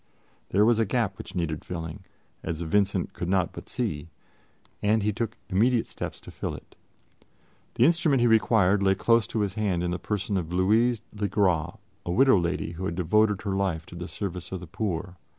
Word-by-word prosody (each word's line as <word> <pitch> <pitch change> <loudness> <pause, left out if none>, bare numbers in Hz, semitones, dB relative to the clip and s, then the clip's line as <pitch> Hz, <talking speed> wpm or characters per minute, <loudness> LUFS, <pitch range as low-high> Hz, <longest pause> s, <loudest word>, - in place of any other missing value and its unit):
There 100 +3 +4
was 115 0 +4
a 115 - +3
gap 105 -4 -1
which - - -9
needed 80 -3 -2
filling, 85 +2 -6 0.4
as 80 -1 -4
Vincent 95 +2 +1
could 90 - -4
not 95 -2 +1
but - - -10
see, 85 -11 -3 0.7
and 105 +1 +2
he 105 0 +1
took 115 +1 -3
immediate 115 +5 +2
steps - - -6
to - - -11
fill - - -4
it. - - -14 1.0
The 120 - +5
instrument 160 -4 +3
he 120 - +3
required 110 -4 +4
lay 95 0 +3
close 115 +3 +3
to 110 - -2
his 100 -3 -1
hand 100 -5 0
in 90 - -1
the 90 - -2
person 100 +1 -2
of 85 -2 -3
Louise 110 +5 +2
le 105 -1 -1
Gras, 90 -5 +1 0.3
a 85 - -3
widow 130 +1 +5
lady 85 -1 -2
who 90 +2 -5
had 85 - -2
devoted 105 +4 +2
her 100 -2 -1
life 90 -5 -1
to - - -12
the 90 +1 -6
service 90 -4 -5
of 95 - -3
the 90 - -9
poor. 90 0 -4
95 Hz, 200 wpm, -27 LUFS, 90-110 Hz, 1.0 s, The